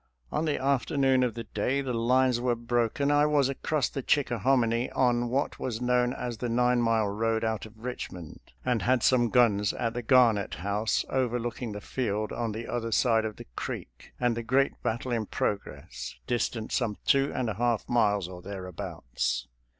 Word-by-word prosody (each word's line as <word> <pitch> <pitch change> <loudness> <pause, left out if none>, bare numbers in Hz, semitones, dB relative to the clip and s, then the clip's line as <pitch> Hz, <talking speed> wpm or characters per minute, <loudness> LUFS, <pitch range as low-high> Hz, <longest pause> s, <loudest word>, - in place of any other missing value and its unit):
On 155 - 0
the 150 - 0
afternoon 135 0 +2
of 125 -2 0
the 115 - -4
day 125 +7 -1
the 135 -3 -2
lines 125 +1 +2
were 125 -1 +1
broken 120 +4 0
I 145 0 +4
was 145 -3 +3
across 140 0 0
the 135 - -5
Chickahominy 120 -2 +2
on 120 -2 +2
what 135 +4 -1
was 115 -3 -3
known 125 0 +2
as 120 -4 -5
the 120 - -2
Nine 125 +1 +3
Mile 115 -2 +2
road 110 +2 0
out 110 -1 -2
of 110 +1 -18
Richmond, 90 -9 -6 0.3
and 125 -4 +1
had 125 -1 +2
some 120 -2 +4
guns 105 -4 +3
at 115 -1 -2
the 120 - -3
Garnett 115 -4 +4
House 100 +5 0
overlooking 120 -3 -1
the 105 - -6
field 110 -2 -2
on 115 -2 -2
the 110 +2 -6
other 115 -1 -3
side 115 -1 +3
of 110 -1 -4
the - - -10
creek, - - -6
and 120 -2 +2
the 115 - -3
great 135 +4 +2
battle 120 +3 -2
in 115 -3 -1
progress, 100 -1 -4
distant 115 -2 -2
some 115 -5 0
two 140 0 +3
and 130 -3 -1
a 110 - -1
half 120 +2 0
miles 105 -6 +2
or 90 -1 -9
thereabouts. 90 -11 -4
120 Hz, 180 wpm, -28 LUFS, 110-125 Hz, 0.3 s, I